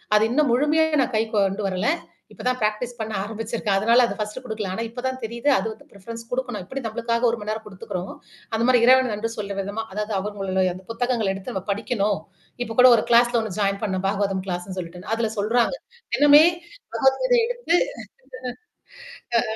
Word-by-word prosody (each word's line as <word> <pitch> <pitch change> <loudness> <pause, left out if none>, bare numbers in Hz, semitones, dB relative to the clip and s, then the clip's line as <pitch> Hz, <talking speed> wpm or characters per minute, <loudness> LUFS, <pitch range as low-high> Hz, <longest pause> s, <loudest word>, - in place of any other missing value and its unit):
அது 210 - +5
இன்னும் 290 +2 +2
முழுமையா 300 +5 +3 0.2
நான் 255 -1 -1
கைக்கு 220 0 0
கொண்டு 200 +1 +1
வரல. 185 +7 0 0.4
இப்ப - - -11
தான் 255 0 +1
பிராக்டிஸ் 215 +3 -1
பண்ண 220 0 -4
ஆரம்பிச்சிருக்கேன். 220 -1 -2
அதனால 235 +4 +5
அத - - -4
ஃபர்ஸ்ட் 210 +4 -4
குடுக்கல. 215 -5 -4
ஆனா 225 - -3
இப்ப 245 +2 -7
தான் 260 0 -3
தெரியுது. 235 +5 -1
அது - - -1
வந்து 215 - -19
ப்ரிஃபெரன்ஸ் 230 +4 -9
குடுக்கணும். 250 -5 -3
எப்படி 265 +8 -5
நம்மளுக்காக 235 +2 0
1 230 - -1
மணி 210 - -5
நேரம் 220 0 -4
குடுத்துக்குறோமோ. 190 -2 -6 0.4
அந்த 225 - +1
மாரி 250 -1 +6
இறைவனுக்கு 260 -1 +5
நன்றி 215 +2 -2
சொல்ற 200 -1 -4
விதமா 205 +3 -4
அதாவது 210 +1 -3
அவங்களுடைய 190 -2 -1
அந்த 185 - -11
புத்தகங்கள 230 -2 0
எடுத்து 195 +6 -7
நம்ம 190 - -3
படிக்கணும். 205 -2 0 0.4
இப்பக்கூட 245 +2 +5
ஒரு - - 0
கிளாஸ்ல 240 0 +5
1 220 -5 -5
ஜாயின் 200 0 0
பண்ணேன். 190 -2 -1
பாகவதம் 195 -2 -1
கிளாஸ்ன்னு 180 +1 -4
சொல்லிட்டுன்னு. 180 +3 -7
அதுல 225 -1 0
சொல்றாங்க. 235 - +2 0.4
என்னமே 290 +1 +8 0.5
பகவத் 265 0 +3
கீதைய - - +4
எடுத்து 485 -8 +1 1.6
ஆ - - +3
220 Hz, 180 wpm, -23 LUFS, 200-245 Hz, 1.6 s, என்னமே